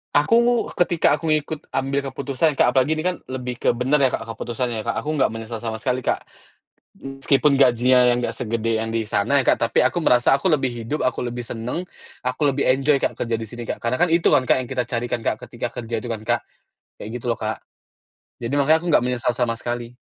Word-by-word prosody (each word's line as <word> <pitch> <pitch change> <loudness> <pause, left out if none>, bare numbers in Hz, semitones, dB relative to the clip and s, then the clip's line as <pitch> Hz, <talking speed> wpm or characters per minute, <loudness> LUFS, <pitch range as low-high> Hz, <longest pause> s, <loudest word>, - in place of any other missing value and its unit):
Aku, 235 +11 +3
ketika 170 -4 +2
aku 165 - -4
ngikut 155 0 -1
ambil 135 +1 0
keputusan, 140 +3 0
Kak, 125 - +4
apalagi 130 +5 +2
ini 155 - -3
kan 180 0 0
lebih 125 -2 -5
ke - - +2
bener 130 +5 +1
ya, 135 - +4
Kak, 115 - -3
keputusannya 115 +1 -4
ya, - - -5
Kak. 115 - 0
Aku 155 - -2
nggak 130 - +4
menyesal 115 0 -6
sama 115 0 -4
sekali, 125 +1 0
Kak. - - -1 0.8
M 135 0 -8
meskipun 140 +1 +3
gajinya 125 -1 +5
yang 120 - 0
nggak - - -2
segede 115 -1 -1
yang 115 0 -3
di 115 -2 -2
sana 130 +9 +2
ya, - - +1
Kak, - - +5
tapi 115 - +2
aku 130 +7 +1
merasa 125 +1 +4
aku 175 +5 0
lebih 135 -3 +2 0.2
hidup, 150 +7 -3
aku 130 -1 -1
lebih 120 0 -4
seneng, 120 +6 -4 0.4
aku 125 +2 -4
lebih 140 -1 +1
enjoy, 135 +2 +2
Kak, - - -1
kerja 115 -1 -2
di 110 - -5
sini, 120 +1 -8
Kak. - - -5
Karena 115 +2 0
kan 175 +4 +3
itu 170 0 +4
kan, 130 - +4
Kak, - - +3
yang 125 - -9
kita 130 -2 -1
cari 120 0 -3
kan, 120 - -2
Kak, - - +1
ketika 120 0 -4
kerja 115 0 -6
itu 120 - -6
kan, 110 - -4
Kak? 120 +1 +1 0.6
Kayak 105 - -7
gitu 125 - -12
loh, 115 - -3
Kak. 110 0 -2 0.8
Jadi 120 +3 -3
makanya 150 +3 +4
aku 175 - -5
nggak 150 - +4
menyesal 125 -1 0
sama 120 -2 +1
sekali. 120 +1 -5
125 Hz, 235 wpm, -22 LUFS, 115-140 Hz, 0.8 s, gajinya